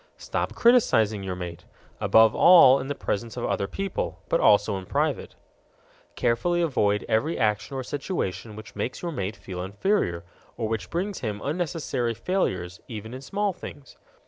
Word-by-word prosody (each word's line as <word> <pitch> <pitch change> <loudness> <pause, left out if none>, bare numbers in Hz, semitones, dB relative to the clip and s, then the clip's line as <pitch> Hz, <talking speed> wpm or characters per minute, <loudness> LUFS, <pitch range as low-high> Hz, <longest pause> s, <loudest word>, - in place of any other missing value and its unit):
Stop - - -3
criticizing 110 - +4
your 95 -1 -4
mate 90 -2 -7 0.4
above 110 -1 +5
all 150 -7 +7
in 135 - -5
the 145 - -3
presence 115 +2 -3
of - - -2
other 100 - -1
people, 195 - -4
but - - +2
also 105 -1 +4
in 95 -1 -8
private. - - -1 0.8
Carefully 125 +9 +1
avoid 105 -11 +1
every 120 +9 +1
action 105 +2 0
or 130 - -3
situation 115 - -4
which 105 -2 -11
makes 130 - -4
your 170 - -2
mate 105 - -3
feel 90 -4 -7
inferior, 95 - -1 0.3
or 115 - -1
which 110 -4 -3
brings 190 +3 -2
him 105 -3 -3
unnecessary 145 -6 -2
failures, 95 - -2
even 110 0 -7
in 130 - -7
small 200 +7 -1
things. 145 -6 -11
115 Hz, 160 wpm, -26 LUFS, 100-165 Hz, 0.8 s, all